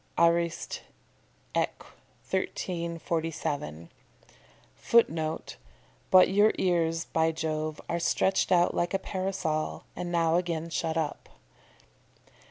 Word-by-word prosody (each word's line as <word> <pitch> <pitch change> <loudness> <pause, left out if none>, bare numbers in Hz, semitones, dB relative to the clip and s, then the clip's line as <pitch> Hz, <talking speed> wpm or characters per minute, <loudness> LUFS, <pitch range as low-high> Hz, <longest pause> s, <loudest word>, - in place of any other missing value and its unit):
Arist. 170 0 +1 0.7
Eq., - - 0 0.5
1347. 165 - -3 0.8
[Footnote: 160 -9 +1 0.5
"But 185 -1 +7
your 205 +3 +4
ears, 165 -2 +1
by 160 0 +1
Jove, 155 -1 -3
are 170 - -1
stretched 190 +3 +1
out 175 -1 +4
like 175 +2 0
a - - +4
parasol, 185 -5 -2
and 175 -1 -4
now 165 -1 +3
again 170 -2 -2
shut 160 0 -1
up." 155 -2 -3
170 Hz, 95 wpm, -28 LUFS, 160-175 Hz, 0.8 s, But